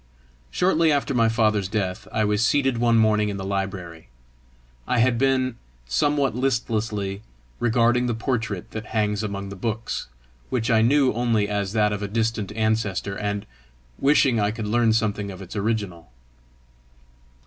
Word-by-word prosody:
Shortly 170 - +2
after 140 -1 0
my 115 -2 +3
father's 110 -3 +1
death, 95 -2 -3
I 110 -1 +1
was 105 +1 +1
seated 135 -1 +2
one 115 -1 +3
morning 105 -1 +3
in 100 - -4
the 95 - -5
library. 95 -5 -4 0.8
I 125 - +1
had 120 0 +3
been, 130 -2 +1 0.3
somewhat 135 - +1
listlessly, 110 -5 -1 0.4
regarding 120 +1 +2
the 120 - -1
portrait 110 -5 -3
that 110 -1 -6
hangs 105 -1 +1
among 100 -2 -4
the 100 - -7
books, 110 +3 -3 0.4
which 120 -2 0
I 110 -1 +4
knew 135 +3 +3
only 115 -3 +1
as 100 -1 -2
that 105 -1 +2
of 105 - -4
a 100 - -2
distant 110 -1 -1
ancestor, 110 -3 -1
and 105 0 -3 0.5
wishing 135 -4 +3
I 105 0 +2
could 110 0 -4
learn 115 +2 +2
something 105 -2 0
of 95 -2 -8
its 95 +1 -9
original. 100 - -2
110 Hz, 155 wpm, -24 LUFS, 100-120 Hz, 0.8 s, I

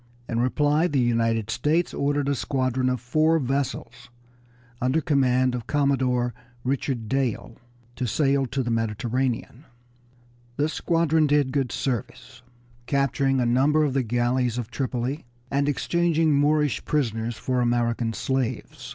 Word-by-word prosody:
In 115 - -2
reply 145 +6 +2
the 145 - -1
United 115 -2 +1
States 160 +8 0
ordered 145 0 0
a 140 - +2
squadron 130 -1 0
of 125 -1 -1
four 155 +7 +2
vessels 125 -3 -3 0.7
under 130 +5 +2
command 130 -4 +2
of 120 -2 -5
Commodore 130 -4 +1 0.3
Richard 130 -3 -2
Dale 130 -2 -2 0.4
to 125 - -1
sail 135 +2 +1
to 135 +2 -2
the 120 - -2
Mediterranean. 115 +4 -2 0.9
This 150 +2 0
squadron 160 -2 +2
did 145 -2 +2
good 135 -3 -1
service, 130 0 -4 0.5
capturing 135 -1 +1
a 125 - +1
number 140 +6 +3
of 145 -3 0
the 135 - +2
galleys 120 +1 0
of 120 -1 -4
Tripoli, 130 +2 -2 0.3
and 140 +1 +1
exchanging 165 +1 +1
Moorish 145 0 +2
prisoners 115 -5 -1
for 130 -1 -1
American 120 -1 0
slaves. 130 +2 -3
130 Hz, 135 wpm, -25 LUFS, 120-145 Hz, 0.9 s, number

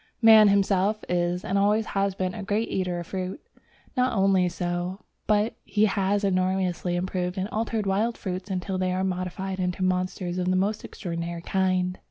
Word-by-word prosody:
Man 220 -1 +9
himself 200 +1 +2
is, 175 +2 0
and 200 -1 +1
has - - +3 0.2
always 195 -2 -1
been, 185 -1 -2
a - - -6
great 205 +3 -1
eater 180 -2 -1
of 170 - -6
fruit. 185 - -4 0.6
Not 255 -1 +2
only 190 -2 +3
so, 175 +2 -3 0.3
but 210 +1 +2
he 210 0 +2
has 200 0 +1
enormously 185 -2 0
improved 180 +1 -2
and 190 +1 -1
altered 220 -1 -1
wild 210 +5 0
fruits 185 +1 -5
until 185 0 -2
they 185 0 0
are 185 +1 0
modified 190 +1 -3
into 180 0 -1
monsters 185 -1 -1
of 180 0 0
the 185 - +2
most 205 +3 0
extraordinary 170 -2 -5
kind. 185 -1 0
185 Hz, 175 wpm, -26 LUFS, 180-200 Hz, 0.6 s, Man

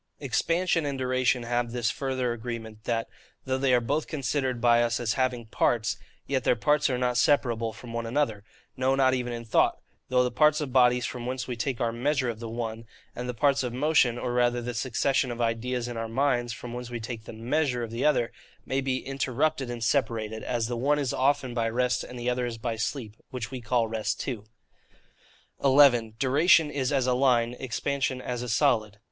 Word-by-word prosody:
Expansion 165 +5 +1
and 140 -2 -2
duration 130 -1 +1
have 120 0 -1
this 120 -1 0
further 130 -3 -2
agreement, 110 -2 -7
that, 115 -1 -1 0.4
though 130 0 -1
they 135 -1 +2
are 125 - +5
both 145 +6 -1
considered 135 -4 -1
by 120 0 +4
us 120 0 +1
as 115 -2 0
having 125 -3 -1
parts, 110 0 0 0.3
yet 135 -1 -1
their - - +3
parts 150 +5 +2
are 125 - 0
not 125 -1 0
separable 120 -6 +2
one 110 - -6
from 115 -2 -9
another, 115 -5 0 0.3
no 130 0 +1
not 130 -1 +3
even 125 -1 -2
in 120 0 -5
thought: 110 - +2 0.3
though 125 0 +4
the 125 - -1
parts 150 +4 +4
of 145 -5 -4
bodies 125 -1 +4
from 120 -1 -5
whence 130 -1 -3
we 125 - -3
take 125 +1 -2
our 120 -2 +1
MEASURE 130 +2 0
of 110 - -10
the 115 -1 -6
one; 115 -1 -4 0.3
and 125 +1 -4
the - - -2
parts 140 +2 +3
of 125 -2 -3
motion, 130 -3 +3
or 120 0 -3
rather 120 0 +2
the 120 0 -4
succession 130 +2 0
of 120 0 -5
ideas 120 +1 -1
in 120 -1 -5
our 115 0 -3
minds, 120 -1 +1
from 120 +1 -7
whence 125 0 -6
we 120 -1 -4
take 115 -1 -6
the - - -8
MEASURE 125 +2 -1
of 115 - -6
the 115 +3 -3
other, 125 -6 +2 0.3
may 135 +1 0
be 130 -1 -2
interrupted 135 +1 -1
and 120 -1 -4
separated; 110 -3 0
as 120 -2 -1
the 120 +1 -3
one 140 +5 +2
is 140 -4 -1
often 135 -1 +1
by 115 -1 0
rest, 125 +2 0
and 125 - -9
the 120 0 -4
other 125 0 0
is 115 -1 -5
by 115 0 -3
sleep, 110 -1 -4
which 125 -2 -5
we 130 -2 -5
call 115 0 +1
rest 110 -1 -2
too. 115 -6 -4 1.2
11. 130 -5 +5
Duration 150 +4 +4
is 135 -2 -1
as 135 -3 +2
a 130 - +2
Line, 125 -2 +3
Expansion 130 +1 -2
as 125 -1 -4
a 125 - -4
Solid. 110 -5 +2
125 Hz, 210 wpm, -27 LUFS, 115-135 Hz, 1.2 s, are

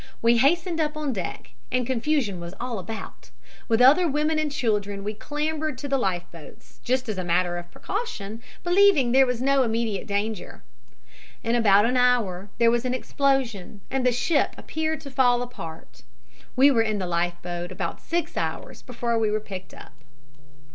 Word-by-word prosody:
We 235 +1 +4
hastened 330 +6 +2
up 305 0 -1
on 295 -3 -1
deck, 180 - -5 0.2
and 250 -1 +1
confusion 250 - 0
was 170 +2 -8
all 240 -3 -3
about. 220 +4 -8 0.4
With 230 0 +2
other 300 +8 +6
women 305 +1 +1
and 305 -1 -1
children 205 -7 -1
we 210 +1 -3
clambered 300 +3 -3
to 285 - -5
the 275 -1 +1
life 185 -6 0
boats, 165 -4 -14
just 255 +1 0
as 210 -4 -3
a - - -2
matter 175 0 +1
of 175 0 -11
precaution, 230 - -5 0.2
believing 350 -8 +4
that 260 - +3
there 270 - +7
was 250 0 -2
no 275 0 +4
immediate 225 -3 -1
danger. 205 0 -3 0.8
In 230 - 0
about 205 -3 +5
an 250 +2 +1
hour 220 -7 +2
there 235 -1 +5
was 240 0 +1
an 255 0 -1
explosion 255 -8 -1
and 265 0 0
the 250 - +4
ship 285 +5 +1
appeared 315 0 -3
to 280 - -9
fall 245 -2 +3
apart. 165 -10 -9 0.5
We 270 +2 +6
were 235 -4 +3
in 215 -2 0
the 190 - -2
life 175 0 0
boat 175 0 -5
about 185 +1 -4
six 335 -1 -2
hours - - -4
before 235 -1 -2
we 220 -1 +2
were 215 +1 0
picked 190 -5 -8
up." - - -13
240 Hz, 180 wpm, -25 LUFS, 200-275 Hz, 0.8 s, there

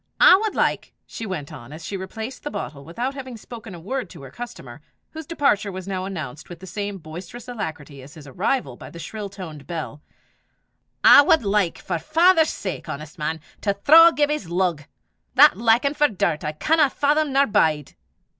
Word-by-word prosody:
"I - - +9
wad 430 0 -2
like," - - -1
she 225 - -7
went 155 -5 -5
on, 130 -2 -11
as 155 +1 -9
she 200 - -5
replaced 220 +6 -6
the 295 - -5
bottle 140 - -6
without 235 - -4
having 260 -3 -8
spoken 225 -3 -10
a - - -10
word 220 +3 -4
to 140 - -12
her 135 - -11
customer, 240 - -9 0.3
whose 320 -1 -9
departure 215 -11 +1
was 185 0 -7
now 185 -1 -3
announced 155 -9 -7
with 175 -2 -9
the 190 - -10
same 200 +2 -5
boisterous 180 +9 -10
alacrity 160 - -6
as 140 +5 -14
his 155 -3 -12
arrival 205 - -2
by - - -11
the - - -12
shrill 205 +4 -6
toned 165 -7 -10
bell 160 -3 -6 1.0
"I - - +10
wad 290 -1 +3
like, 200 -4 +1
for - - -3
'is - - -10
father's 330 -1 +4
sake, 185 -4 -5
honest 155 +4 -8
man! 155 +1 -3 0.2
to 200 -2 0
thraw 320 +11 +8
Gibbie's 295 - -1
lug. 175 -4 -1 0.5
That - - +7
likin' 235 +5 +3
for 295 0 +3
dirt 180 - -1
I 150 - -3
canna 305 - +2
fathom 295 +2 +1
nor 275 +1 +4
bide." 155 - +1
195 Hz, 190 wpm, -23 LUFS, 160-265 Hz, 1.0 s, I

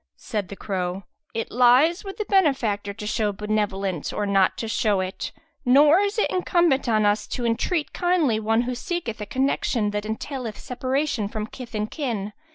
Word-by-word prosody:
Said 205 -3 -3
the 200 - -7
crow, 185 -1 -3 0.3
"It 225 - -3
lies 255 - +5
with 390 -1 -7
the 425 - -2
benefactor 265 - +2
to 210 +1 -8
show 210 0 0
benevolence 200 -4 -2
or 210 - -2
not 195 -2 +3
to 225 - -3
show 215 -2 +1
it; 185 0 -4 0.3
nor 290 +7 +6
is 405 +2 0
it 430 - +1
incumbent 345 -8 +2
on 215 -2 +3
us 205 +1 +1
to 245 - -3
entreat 275 +8 0
kindly 340 -11 +2
one 225 +2 +2
who 250 +1 -2
seeketh 245 -4 -4
a 210 - -5
connection 250 -4 0
that 210 0 -3
entaileth 230 0 -4
separation 260 -3 -1
from 210 0 -4
kith 235 0 -9
and 210 0 -2
kin. 225 -9 -3
225 Hz, 175 wpm, -24 LUFS, 210-280 Hz, 0.3 s, nor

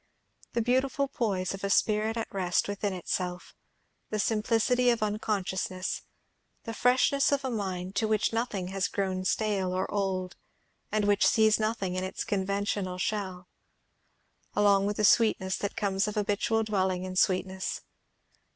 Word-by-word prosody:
The 235 - +1
beautiful 260 +3 +1
poise 195 -9 -1
of 195 - -8
a 200 - 0
spirit 215 +3 +2
at 225 - -4
rest 180 -2 +1
within 205 0 -2
itself; 180 0 -3 0.6
the 215 - -2
simplicity 230 +3 +2
of 235 -2 +1
unconsciousness; 190 -3 -2 0.6
the 225 - -5
freshness 255 +4 +3
of 280 -1 +1
a 260 - -1
mind 190 -3 -3
to 220 - +2
which 215 +1 +1
nothing 215 -6 -2
has 190 -1 0
grown 185 -1 -2
stale 195 -2 0
or 185 +1 0
old, 190 -2 -1 0.6
and 215 -1 +1
which 205 0 +4
sees 220 -1 +4
nothing 215 -4 -1
in 185 0 -2
its 190 - -3
conventional 200 -1 -1
shell; 185 -2 -3 1.1
along 200 -1 +4
with 205 - -2
the 215 - +3
sweetness 190 -3 +3
that 200 - -3
comes 195 -1 0
of 210 - -4
habitual 210 +2 +1
dwelling 190 -4 0
in 185 0 -5
sweetness. 190 0 0
200 Hz, 150 wpm, -29 LUFS, 185-220 Hz, 1.1 s, which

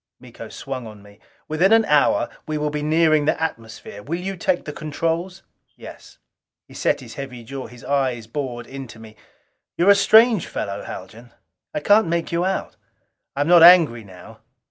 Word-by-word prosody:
Miko - - -12
swung 130 -3 -7
on 105 -2 -13
me. 100 0 -18 0.3
"Within 170 +6 +1
an 225 0 +5
hour 150 -4 +2 0.2
we 155 0 -2
will 150 0 -2
be 150 0 -3
nearing 155 0 +2
the 155 - 0
atmosphere. 110 -9 -6
Will 165 +10 -4
you 190 +2 -5
take 175 0 -1
the 150 - -6
controls?" 165 +4 -4 0.3
"Yes." - - -13 0.5
He - - -17
set - - -1
his - - -11
heavy 125 -3 -8
jaw. 135 +3 -7
His 120 -1 -15
eyes 130 -5 -1
bored 120 -1 -5
into 135 -4 -10
me. 110 -1 -14 0.6
"You're 185 +4 +5
a - - +6
strange 220 0 +4
fellow, 100 0 -5
Haljan. 115 +2 -10 0.4
I 150 - -4
can't 205 +3 +4
make 170 0 -2
you 170 +1 0
out. 190 +1 -3 0.6
I 140 - -2
am 145 - 0
not 175 -1 +6
angry 165 -10 +7
now. 105 +3 -14
150 Hz, 180 wpm, -21 LUFS, 120-170 Hz, 0.6 s, angry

